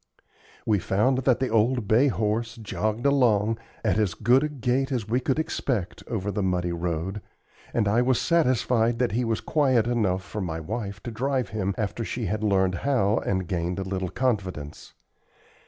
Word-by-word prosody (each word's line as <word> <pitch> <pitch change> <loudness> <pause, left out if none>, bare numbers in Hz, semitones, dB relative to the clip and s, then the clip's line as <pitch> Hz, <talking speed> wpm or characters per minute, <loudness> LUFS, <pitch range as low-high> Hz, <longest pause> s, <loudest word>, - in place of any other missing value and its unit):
We 105 -3 +2
found 110 +9 +1
that 130 -2 +3
the 130 - 0
old 115 0 +2
bay 120 +7 +4
horse 115 -1 -1
jogged 110 +1 -3
along, 115 -6 +3 0.3
at 110 -1 +2
as 95 -6 +1
good 125 +5 +3
a 150 - 0
gait 135 0 -1
as 120 -5 -2
we 120 +3 +1
could 130 +1 -1
expect, 130 - -2
over 100 -3 -2
the 105 - -2
muddy 90 -2 0
road, 85 +3 -3 0.5
and 110 -3 +1
I 110 +4 +3
was 125 0 +2
satisfied 125 -7 +2
that 125 0 +1
he 120 +3 0
was 115 -2 -1
quiet 130 -7 +2
enough 105 -6 0
for 105 +4 -5
my 80 -3 -3
wife 100 +4 -5
to 120 - -5
drive 130 -1 -1
him 100 -2 -2
after 110 +2 -2
she 115 +1 -3
had 105 +3 -2
learned 95 -3 +2
how, 115 -7 +2
and 95 -2 -2
gained 85 +1 -2
a 95 - -2
little 95 -1 -3
confidence. 95 - -3
110 Hz, 180 wpm, -26 LUFS, 95-125 Hz, 0.5 s, bay